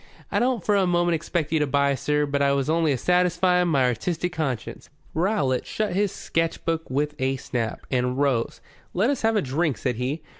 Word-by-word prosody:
"I -, -, +2 dB
don't 245 Hz, -5 st, 0 dB
for 210 Hz, -, +3 dB
a 195 Hz, -2 st, +3 dB
moment 175 Hz, 0 st, +2 dB
expect 160 Hz, -1 st, -2 dB
you 160 Hz, -, +2 dB
to 150 Hz, -, +1 dB
buy, 140 Hz, 0 st, +2 dB
sir, 150 Hz, +2 st, 0 dB
but 140 Hz, 0 st, -1 dB
I 140 Hz, 0 st, +3 dB
was 140 Hz, +2 st, 0 dB
only 165 Hz, -2 st, +2 dB
a 135 Hz, -, +1 dB
satisfying 180 Hz, +3 st, +2 dB
of 180 Hz, -, +1 dB
my 140 Hz, -6 st, +3 dB
artistic 170 Hz, +9 st, -1 dB
conscience." 130 Hz, -8 st, -4 dB, 0.2 s
Rowlatt 160 Hz, -, 0 dB
shut 215 Hz, -4 st, -2 dB
his 200 Hz, +1 st, +1 dB
sketch 165 Hz, 0 st, -2 dB
book 165 Hz, -1 st, -2 dB
with 145 Hz, +3 st, -1 dB
a 130 Hz, +1 st, +1 dB
snap, 120 Hz, -3 st, -3 dB
and 125 Hz, 0 st, 0 dB
rose. 135 Hz, -5 st, 0 dB, 0.3 s
"Let 210 Hz, +9 st, +3 dB
us 280 Hz, -, -2 dB
have 225 Hz, 0 st, +2 dB
a 205 Hz, -, +2 dB
drink," 140 Hz, 0 st, 0 dB
said 125 Hz, -1 st, -2 dB
he. 135 Hz, +6 st, -3 dB
155 Hz, 215 wpm, -24 LUFS, 135-180 Hz, 0.3 s, for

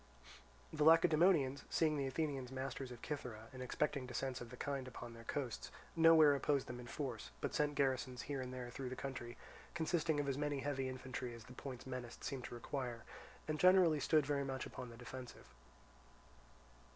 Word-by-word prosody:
The 150 Hz, -, +1 dB
Lacedaemonians 160 Hz, -3 st, +5 dB
seeing 155 Hz, -2 st, +3 dB
the 140 Hz, -2 st, 0 dB
Athenians 135 Hz, -2 st, -2 dB
masters 135 Hz, 0 st, -4 dB
of 120 Hz, -, -9 dB
Cythera, 120 Hz, -7 st, -5 dB
and 130 Hz, -, -7 dB
expecting 135 Hz, +1 st, -1 dB
descents 130 Hz, 0 st, -2 dB
of 120 Hz, -, -7 dB
the 125 Hz, -, -9 dB
kind 140 Hz, -2 st, -2 dB
upon 120 Hz, -1 st, -8 dB
their 115 Hz, 0 st, -11 dB
coasts, 130 Hz, -2 st, -3 dB, 0.3 s
nowhere 160 Hz, -2 st, +8 dB
opposed 140 Hz, 0 st, +1 dB
them 120 Hz, 0 st, -6 dB
in 120 Hz, -, -8 dB
force, 120 Hz, -, -4 dB
but -, -, -2 dB
sent 145 Hz, -1 st, +1 dB
garrisons 130 Hz, -2 st, 0 dB
here 140 Hz, -2 st, -3 dB
and 125 Hz, 0 st, -5 dB
there 125 Hz, -1 st, -5 dB
through 130 Hz, +1 st, -4 dB
the 130 Hz, -, -4 dB
country, 125 Hz, -3 st, -5 dB, 0.4 s
consisting 160 Hz, -2 st, +1 dB
of 145 Hz, -, 0 dB
as 135 Hz, 0 st, 0 dB
many 145 Hz, -2 st, 0 dB
heavy 135 Hz, -2 st, -1 dB
infantry 130 Hz, -1 st, -5 dB
as 115 Hz, -, -10 dB
the 125 Hz, +2 st, -12 dB
points 130 Hz, -1 st, -7 dB
menaced 125 Hz, -2 st, -6 dB
seemed 130 Hz, -3 st, -3 dB
to -, -, -6 dB
require, 120 Hz, -1 st, -4 dB, 0.4 s
and 155 Hz, -1 st, -1 dB
generally 180 Hz, -4 st, +6 dB
stood 155 Hz, +1 st, +4 dB
very 140 Hz, 0 st, +1 dB
much 135 Hz, -1 st, -3 dB
upon 125 Hz, -, -7 dB
the 115 Hz, -, -11 dB
defensive. 125 Hz, +1 st, -9 dB
135 Hz, 185 wpm, -38 LUFS, 125-145 Hz, 0.4 s, nowhere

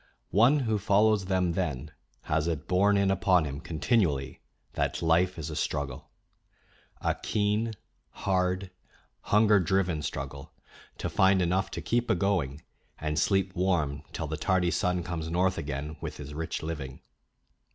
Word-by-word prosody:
One 125 Hz, +8 st, +5 dB
who 110 Hz, -4 st, 0 dB
follows 105 Hz, 0 st, +3 dB
them 90 Hz, -2 st, +1 dB
then 80 Hz, -5 st, -3 dB, 0.3 s
has 80 Hz, +1 st, 0 dB
it 80 Hz, -5 st, -3 dB
borne 100 Hz, +3 st, +3 dB
in 100 Hz, -1 st, +3 dB
upon 90 Hz, -3 st, +3 dB
him 70 Hz, -1 st, -5 dB
continually 80 Hz, -, 0 dB, 0.3 s
that -, -, -1 dB
life 85 Hz, +3 st, +3 dB
is 80 Hz, 0 st, -5 dB
a -, -, -5 dB
struggle, 70 Hz, -4 st, -3 dB, 0.9 s
a -, -, +1 dB
keen, 105 Hz, +2 st, 0 dB, 0.4 s
hard, 90 Hz, 0 st, -1 dB, 0.5 s
hunger 105 Hz, 0 st, +5 dB
driven 90 Hz, -3 st, +1 dB
struggle 70 Hz, -1 st, -6 dB, 0.4 s
to -, -, -3 dB
find 95 Hz, 0 st, +4 dB
enough 90 Hz, +2 st, +1 dB
to -, -, -6 dB
keep 120 Hz, 0 st, 0 dB
a -, -, +4 dB
going 85 Hz, -7 st, -1 dB, 0.3 s
and 75 Hz, 0 st, -1 dB
sleep 95 Hz, -2 st, +1 dB
warm 85 Hz, -6 st, 0 dB
till -, -, -4 dB
the -, -, -4 dB
tardy 90 Hz, -2 st, +1 dB
sun 90 Hz, -2 st, 0 dB
comes 85 Hz, -2 st, -4 dB
north 90 Hz, +1 st, +1 dB
again 75 Hz, +1 st, -4 dB
with -, -, -5 dB
his 75 Hz, 0 st, -8 dB
rich 80 Hz, +2 st, -4 dB
living. 75 Hz, -5 st, -5 dB
90 Hz, 150 wpm, -28 LUFS, 75-95 Hz, 0.9 s, One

